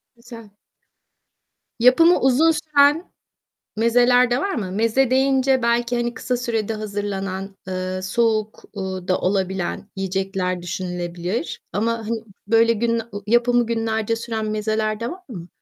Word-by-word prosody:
Güzel. 235 -2 -12 1.3
Yapımı 330 +9 +6
uzun 270 +5 +4
süren 305 +1 +2 0.7
mezeler 245 +2 +4
de 245 - +2
var 395 +7 -1
mı? 190 -5 -3
Meze 230 +5 +2
deyince 265 0 +3
belki, 235 +1 +1
hani, 240 0 -1
kısa 250 - -2
sürede 225 -3 -2
hazırlanan, 200 -2 -4
eee, 185 0 -3
soğuk, 215 +1 0
uuu, 190 -2 -5
da 185 - +2
olabilen 190 0 -2
yiyecekler 190 -1 -2
düşünülebilir 180 - -4
ama 230 +3 0
hani 225 0 -4 0.2
böyle 230 +1 +4
gün 230 +1 0
ı - - -2 0.2
yapımı 240 +1 +3
günlerce 225 -1 -1
süren 225 -1 -4
mezeler 215 0 -1
de 235 - -3
var 365 +2 -9
mı? 180 -8 -8
225 Hz, 130 wpm, -22 LUFS, 195-245 Hz, 1.3 s, Yapımı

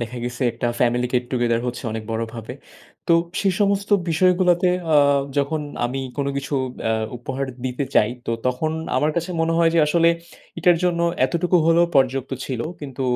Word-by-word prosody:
দেখা 120 +1 -5
গেছে 120 +1 -4
একটা 120 +1 -3
Family 125 0 +2
Get 125 0 +1
Together 120 -2 +1
হচ্ছে 125 - -4
অনেক 110 0 -4
বড়ভাবে। 115 +1 -5 0.6
তো - - +5 0.3
সেই 195 -2 +2
সমস্ত 200 0 +1 0.2
বিষয়গুলাতে 180 +1 +3 0.3
আ - - +7 0.4
যখন 145 +2 0 0.2
আমি 130 +3 -2 0.2
কোন 140 -1 -1
কিছু 140 +1 -3 0.3
অ্যা 110 - +1 0.3
উপহার 135 +2 -4 0.2
দিতে 130 +2 -2
চাই, 105 - +4 0.2
তো - - -1 0.2
তখন 125 +5 0 0.3
আমার 150 - +2
কাছে 170 +2 -1
মনে 165 0 +1
হয় 165 -1 +4
যে - - +4
আসলে 165 +2 +3 0.5
এটার 175 0 +4
জন্য 175 -1 +1 0.3
এতটুকু 175 +6 +1
হলেও 170 +1 +4
পর্যাপ্ত 135 0 +1
ছিল। 130 -4 -4 0.2
কিন্তু 135 -2 -6
140 Hz, 170 wpm, -22 LUFS, 125-170 Hz, 0.6 s, আ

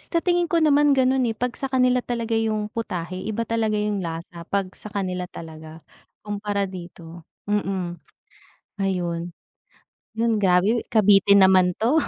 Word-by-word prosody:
Sa 335 -1 -2
tingin 350 -2 +2
ko 340 - +1
naman 295 -3 +4
gano'n, 260 -1 +2
eh, 225 - -3
'pag 250 +1 -2
sa 270 - -4
kanila 255 -1 +2
talaga 235 -2 -4
yung 215 -1 -1
putahe, 185 -5 -4
iba 220 +2 -2
talaga 225 -2 0
yung 210 -1 -1
lasa, 170 0 -6
'pag 195 -2 -1
sa - - -9
kanila 185 -3 -3
talaga, 160 -1 -11 0.4
kumpara 205 -1 -2
dito, 175 -3 -9 0.2
mm, 190 -4 -2 0.8
ayun. 175 -3 -2 0.9
'Yon, 225 -1 +1
grabe, 195 +4 +2
kabitin 200 -2 +5
naman 185 -2 +4
'to. 255 +9 +2
205 Hz, 145 wpm, -23 LUFS, 180-230 Hz, 0.9 s, kabitin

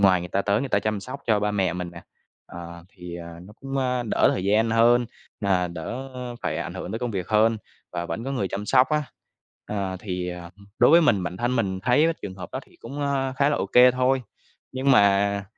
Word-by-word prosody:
ngoài 95 -3 +5
người 90 - -6
ta 100 +2 0
tới 100 +1 +1
người 140 - -3
ta 100 - +2
chăm 105 0 -2
sóc 130 +6 -8
cho 110 -3 +3
ba 105 0 0
mẹ 95 -4 0
mình 90 -1 -5
nè, 85 - -11 0.4
ờ, 85 0 -10
thì, 90 -3 -10
ờ, 85 -1 -9
nó 100 - -13
cũng, 135 0 -5
ơ, 125 -1 0
đỡ - - +3
thời 95 - -3
gian 110 +3 +2
hơn, 120 +1 +4 0.3
à, 95 -3 +1
đỡ 100 +11 -6 0.3
phải - - -1
ảnh - - -5
hưởng 95 - -6
tới 110 - -2
công 125 -1 -3
việc 95 -5 -4
hơn, 110 +1 +3 0.4
và 85 -1 -3
vẫn 115 - -4
có 135 - -3
người 105 -8 -1
chăm 105 +2 -5
sóc 130 +2 +4
á. 150 -1 0 0.6
Ờ, 100 -3 -3
thì, 90 -3 -4
ờ, 90 -1 -7 0.3
đối 120 - +6
với 170 - +8
mình, 115 - +3
bản 90 0 -4
thân 120 +5 -1
mình 95 -4 -1
thấy 130 +8 +4 0.2
trường 95 -2 -6
hợp 90 -2 -8
đó - - -3
thì - - -23
cũng, 140 +5 -7
a, 135 -2 0
khá 140 +2 +2
là 150 - +1
ô - - -1
kê 125 +1 +7
thôi, 130 +1 +1 0.5
nhưng 130 +1 +1
mà 100 -3 +4
105 Hz, 240 wpm, -24 LUFS, 90-125 Hz, 0.6 s, với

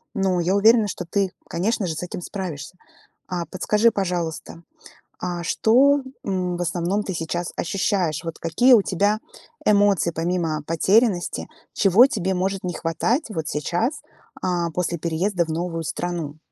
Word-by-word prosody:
Но 190 -2 +1
я 180 +3 +1
уверена, 220 +1 +5
что 180 - -5
ты, 195 +1 0 0.2
конечно 205 +4 0
же, 160 - -3
с - - -5
этим 180 0 -6
справишься. 175 -4 -6 0.5
А 175 -2 -3
подскажи, 210 +4 +2
пожалуйста, 175 -4 -3 0.6
а 175 -1 -3
что, 270 +10 +4 0.2
м, 180 -3 -1
в - - -4
основном 175 +4 -1
ты 190 - -4
сейчас 170 +1 -3
ощущаешь? 180 -3 0
Вот 165 - -5
какие 240 +11 +4
у 225 - +7
тебя 205 +4 +1 0.5
эмоции, 200 -5 +3
помимо 165 -2 -1
потерянности, 190 +3 +2 0.3
чего 210 +7 +6
тебе 190 -8 -1
может 190 +1 -1
не 180 - -2
хватать 225 - 0
вот 160 -7 -4
сейчас, 175 - -1 0.4
а, 175 -2 0
после 175 0 -1
переезда 170 +2 0
в - - -12
новую 165 +1 -3
страну? 160 -2 -4
180 Hz, 150 wpm, -23 LUFS, 170-205 Hz, 0.6 s, у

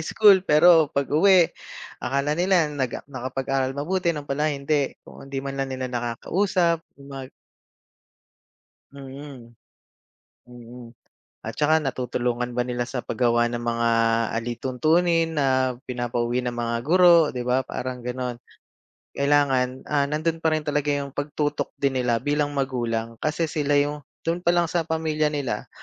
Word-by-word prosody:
school 195 +3 +5
pero 160 -2 +5
pag-uwi 165 +5 +4 0.5
akala 140 +3 0
nila 175 0 +3
nag 130 -4 -3
nakapag-aral 135 0 -3
mabuti 175 +5 -1
'yon 150 -4 -1
pala 150 +2 -1
hindi, 140 0 -1
kung 135 - -13
hindi 140 - -6
man 135 0 -4
lang 135 - -2
nila 130 0 -4
nakaka-usap 170 - 0 0.2
mag 135 -2 -8 1.6
Mhm, 135 -3 -10 1.0
mm. 120 0 -12 0.5
At - - -7
saka 155 +1 +3
natutulungan 125 -2 -2
ba 125 - 0
nila 120 0 -2
sa 125 -1 -4
paggawa 120 -1 +1
ng 120 0 -4
mga 115 0 0 0.5
alituntunin 160 +8 +1
na 130 -3 +1 0.2
pinapauwi 120 0 -1
ng 120 - -2
mga 120 -1 -2
guro 170 -2 +6
'di 125 - -3
ba, 125 +2 0
parang 125 -1 -5
gano'n. 125 -1 -3 0.8
Kailangan, 135 -3 +1
ah, 145 -2 +1
nando'n 155 +3 -2
pa 160 - +3
rin 155 -1 -1
talaga 145 0 0
yung 140 -1 -3
pagtutok 145 0 -2
din 140 -2 0
nila 120 -2 +1
bilang 145 +1 0
magulang. 120 -4 -2
Kasi 160 +2 0
sila 145 -3 +1
yung 145 0 -2 0.2
do'n 170 +1 0
pa - - +2
lang 175 -1 +2
sa 170 +1 -1
pamilya 160 -2 -1
nila 145 -4 -3
140 Hz, 140 wpm, -24 LUFS, 125-155 Hz, 1.6 s, guro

